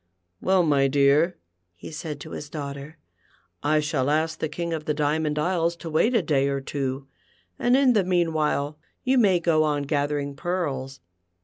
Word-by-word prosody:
"Well, 185 -1 +3
my 140 -4 +3
dear," 145 +5 +3 0.4
he 85 - -10
said 155 -2 -6
to - - -9
his 145 - -7
daughter, 140 +1 -7 0.6
"I 155 +1 +2
shall 150 -3 0
ask 155 +1 0
the 155 - -2
King 170 +2 -3
of 155 -2 -4
the 150 - -1
Diamond 150 +1 0
Isles 170 +1 +1
to 170 -1 -8
wait 225 +11 +2
a 220 - +3
day 140 -3 +2
or 140 0 -1
two, 135 0 -4 0.5
and 245 +2 +3
in 270 -2 +4
the 205 -4 +3
meanwhile 155 -4 0 0.2
you 260 0 +3
may 195 -6 +4
go 165 -2 +2
on 145 -2 0
gathering 145 -1 -1
pearls. 140 - -3
150 Hz, 175 wpm, -25 LUFS, 140-170 Hz, 0.6 s, in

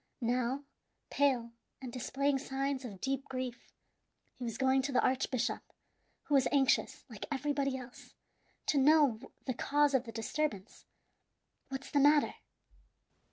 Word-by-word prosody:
Now, 250 +2 0 0.5
pale 255 -5 +2 0.3
and 255 -3 -7
displaying 270 +2 0
signs 270 0 -2
of 200 -6 -8
deep 270 +5 -1
grief, 255 -2 -5 0.6
he 255 - -9
was 230 -2 -3
going 265 0 +3
to 275 +2 -3
the 255 - +3
archbishop, 255 -1 0 0.6
who 295 - -3
was 270 -2 +5
anxious, 275 -2 +2
like - - -8
everybody 280 -1 0
else, 250 -1 -12 0.5
to 285 - +2
know 285 -5 +5 0.3
the 255 - -1
cause 290 +3 +2
of 265 -1 +2
the 230 - -7
disturbance. 225 -2 -3 0.8
"What's 270 0 -6
the 290 - +3
matter?" 290 +1 +5
265 Hz, 135 wpm, -33 LUFS, 250-280 Hz, 0.8 s, was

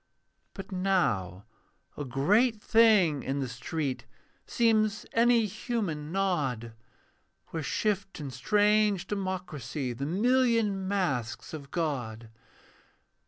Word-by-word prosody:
But 195 -1 -8
now 145 - 0 0.5
a 145 - -4
great 205 - +2
thing 210 - +4
in 135 +2 -2
the 135 - -2
street 130 +4 -4 0.4
Seems 220 -3 +2
any 235 0 +4
human 185 -8 -3
nod, 145 - -1 0.8
Where 165 - -4
shift 200 +4 -2
in 140 -3 -5
strange 205 - +2
democracy 180 - -4
The 135 +4 -4
million 225 0 +2
masks 140 - -2
of 140 -3 -8
God. 125 -10 -3
180 Hz, 100 wpm, -29 LUFS, 135-210 Hz, 0.8 s, thing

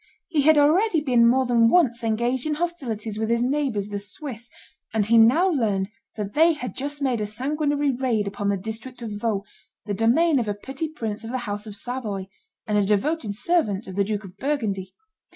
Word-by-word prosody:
He 315 -4 +2
had 315 +2 +5
already 325 +6 +4
been 245 -5 +4
more 260 +2 +3
than 235 -2 +4
once 240 -9 +3
engaged 235 +5 0
in 300 - 0
hostilities 245 -11 -3
with 220 0 -1
his 235 +1 +2
neighbors 255 -7 -1
the 205 -1 -3
Swiss; 240 +2 -7 0.4
and 215 -2 +1
he 230 +2 +5
now 255 +12 +5
learned 210 - 0 0.2
that 205 -2 -4
they 325 +2 +5
had 250 -5 -6
just 285 +1 -4
made 250 -5 +1
a 210 - -1
sanguinary 290 +5 0
raid 240 -5 0
upon 200 0 -2
the 200 - +1
district 220 +5 -7
of 225 - -5
Vaud, 205 -1 -1 0.4
the 205 - -2
domain 265 - +3
of 230 - -2
a 205 - -1
petty 270 +9 -5
prince 225 -8 -5
of 225 - -6
the 255 - -2
house 205 +1 -4
of 205 - -7
Savoy, 215 -5 -4 0.4
and 210 -2 +1
a - - +3
devoted 210 +3 0
servant 220 - 0
of 190 - -8
the 200 - +2
Duke 210 +1 -3
of 190 0 -12
Burgundy. 205 -8 -2
235 Hz, 205 wpm, -24 LUFS, 210-285 Hz, 0.4 s, had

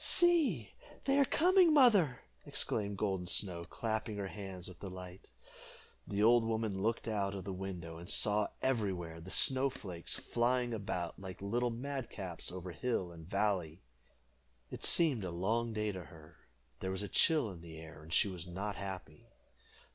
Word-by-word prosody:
"See, 280 - +4 0.3
they 275 +1 +3
are 280 - +6
coming, 355 +2 +4
mother!" 205 - +5 0.2
exclaimed 100 -1 -2
Golden 95 -3 -1
Snow, 90 -2 0
clapping 110 +2 -3
her 100 -1 -3
hands 95 -3 -7
with 90 - -12
delight. 90 -1 -9 0.8
The 105 +1 0
old 120 +1 +6
woman 110 -3 -1
looked 115 +3 -1
out 100 -3 -1
of 95 - -5
the 95 +1 -5
window, 90 -3 -6
and 85 +2 -8
saw 105 0 +4 0.2
everywhere 95 -10 -1
the 90 - -10
snow 135 +6 +5
flakes 90 -9 -4
flying 120 0 0
about, 90 -5 -4
like 95 -1 -8
little 120 +5 0
madcaps, 115 - -5
over 90 0 -6
hill 90 0 -2
and 80 -1 -12
valley. 95 -5 -1 0.9
It - - -7
seemed 145 - +5
a 90 - -3
long 110 +7 -1
day 105 -1 -1
to 90 -3 -7
her; 80 +2 -15 0.4
there 95 - -3
was 95 +2 -3
a - - -3
chill 150 - +3
in 85 -3 -10
the 80 -2 -10
air, 80 0 -11
and 80 +1 -13
she 100 - +4
was 90 -3 -6
not 100 +4 -4
happy. 95 -6 -7
100 Hz, 165 wpm, -34 LUFS, 90-115 Hz, 0.9 s, are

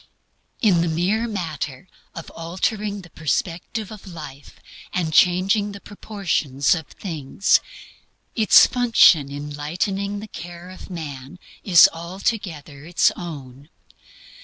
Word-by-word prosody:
In 185 -6 +4
the 170 - 0
mere 185 +8 0
matter 160 - -5 0.3
of 165 - -8
altering 200 +5 -3
the 175 -3 -16
perspective 175 +7 -3
of 210 -2 -11
life 145 -4 -11 0.3
and 165 -4 -1
changing 195 +5 +3
the 200 - -9
proportions 170 -10 -1
of 160 -4 -4
things, 160 -1 0 0.7
its 220 -3 +7
function 230 - +4
in 145 +1 -6
lightening 195 +7 -2
the 215 - -8
care 175 -2 -9
of 185 - -12
man 145 -3 -7 0.3
is 175 -5 +8
altogether 170 -4 -4
its 175 +3 +2
own. 145 -4 -9
175 Hz, 115 wpm, -22 LUFS, 150-200 Hz, 0.7 s, is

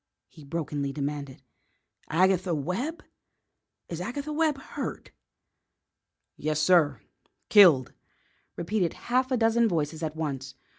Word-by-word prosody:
he 155 - -15
brokenly 145 -2 -3
demanded. 140 -1 -5 0.7
"Agatha 185 +1 +2
Webb? 210 - -3 0.8
Is 170 0 -5
Agatha 285 +9 -4
Webb 310 -2 +1
hurt?" 270 - -6 1.2
"Yes, 155 0 -1
sir; 150 - +3 0.5
killed," 165 - +6 0.6
repeated 175 -1 -1
a - - -16
half 255 +1 +3
dozen 235 -2 +3
voices 160 -4 -2
at 155 -1 -3
once. 135 -4 -4
170 Hz, 105 wpm, -27 LUFS, 150-225 Hz, 1.2 s, killed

